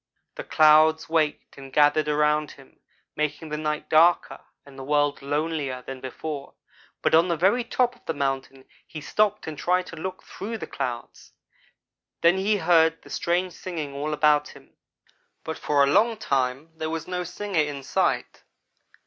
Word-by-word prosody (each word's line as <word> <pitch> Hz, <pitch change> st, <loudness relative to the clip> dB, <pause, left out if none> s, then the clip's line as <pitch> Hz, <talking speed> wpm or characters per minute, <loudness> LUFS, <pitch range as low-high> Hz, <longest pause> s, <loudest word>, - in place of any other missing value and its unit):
The -, -, -7 dB
clouds 155 Hz, +1 st, +4 dB
waked 155 Hz, -3 st, -1 dB
and 135 Hz, 0 st, -11 dB
gathered 145 Hz, +2 st, +3 dB
around 150 Hz, 0 st, +1 dB
him, 135 Hz, -1 st, -19 dB, 0.4 s
making 155 Hz, +1 st, -3 dB
the 150 Hz, -, -3 dB
night 150 Hz, 0 st, -3 dB
darker 170 Hz, +2 st, +3 dB, 0.3 s
and 140 Hz, -1 st, -15 dB
the 135 Hz, -, -8 dB
world 145 Hz, 0 st, +1 dB
lonelier 145 Hz, -2 st, -2 dB
than 135 Hz, 0 st, -8 dB
before, 140 Hz, +2 st, -6 dB, 0.5 s
but -, -, +2 dB
on 165 Hz, +2 st, +5 dB
the 170 Hz, -2 st, 0 dB
very 200 Hz, +9 st, +2 dB
top 245 Hz, +1 st, 0 dB
of -, -, -27 dB
the 165 Hz, -, -2 dB
mountain 135 Hz, -1 st, -3 dB, 0.2 s
he 155 Hz, -, -8 dB
stopped 210 Hz, +6 st, 0 dB
and 160 Hz, -, -5 dB
tried 180 Hz, +1 st, +1 dB
to 165 Hz, -, -10 dB
look 185 Hz, +3 st, -6 dB
through 225 Hz, +4 st, -6 dB
the -, -, -6 dB
clouds. 125 Hz, -3 st, -6 dB, 0.9 s
Then 170 Hz, +2 st, +4 dB
he 205 Hz, +2 st, +1 dB
heard 165 Hz, -2 st, +3 dB
strange 180 Hz, +1 st, -1 dB
singing 160 Hz, -6 st, -6 dB
all 145 Hz, +2 st, -3 dB
about 150 Hz, -1 st, +3 dB
him; 140 Hz, -1 st, -16 dB, 0.7 s
but 160 Hz, -, -5 dB
for 145 Hz, -1 st, +2 dB
a 140 Hz, +1 st, +2 dB
long 225 Hz, +2 st, +3 dB
time 135 Hz, -1 st, -1 dB
there 160 Hz, 0 st, -4 dB
was 160 Hz, -1 st, -4 dB
no 180 Hz, 0 st, -3 dB
singer 180 Hz, 0 st, -2 dB
in 145 Hz, -2 st, -4 dB
sight. -, -, -1 dB
155 Hz, 165 wpm, -25 LUFS, 145-175 Hz, 0.9 s, on